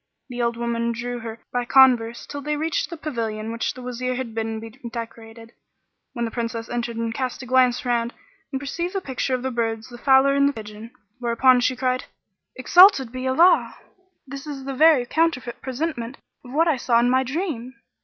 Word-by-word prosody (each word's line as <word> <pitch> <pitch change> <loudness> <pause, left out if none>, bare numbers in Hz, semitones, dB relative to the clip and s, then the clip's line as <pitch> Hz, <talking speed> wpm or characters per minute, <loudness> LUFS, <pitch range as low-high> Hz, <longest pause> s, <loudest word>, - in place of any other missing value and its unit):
[FN#43] - - -56 0.2
The 245 -1 -4
old 235 0 0
woman 235 0 -1
drew 245 +1 -4
her 225 -1 -6
on - - -15 0.2
by 245 0 0
converse 240 -2 +4
till 285 0 -7
they 300 +1 -2
reached 320 +1 -1
the 340 - -7
pavilion 225 -7 -4
which 230 0 -2
the 255 - -10
Wazir 250 +1 -3
had 245 -3 -5
bidden 225 0 -3
be 225 0 -9 0.2
decorated, 230 -1 -9 0.6
when 235 -2 -2
the 225 - -4
Princess 230 -1 -4
entered 235 -1 -3
and 230 0 -2
cast 255 +1 -4
a - - -8
glance 250 0 +2
round 235 -1 0 0.4
and 270 - -2
perceived 340 +7 -4
the - - +1
picture 265 -3 -2
of 250 - -5
the 260 - -2
birds 225 -1 -2
the 240 -1 -11
fowler 270 +1 +5
and 280 0 +4
the - - -4
pigeon; 215 -1 -9 0.3
whereupon 245 +1 +4
she 255 +1 +1
cried, 255 0 -1 0.5
"Exalted 355 - +6
be 255 +1 -4
Allah! 330 +8 +4 0.5
This 275 +2 -9
is 275 -3 -6
the 275 - -4
very 300 -2 +5
counterfeit 290 -4 -1
presentment 260 -2 -4 0.3
of 245 - -12
what 320 +5 +2
I 310 -5 +2
saw 235 -1 +2
in 240 - +3
my 260 +1 +3
dream." 260 -4 -4
250 Hz, 205 wpm, -23 LUFS, 230-270 Hz, 0.6 s, Exalted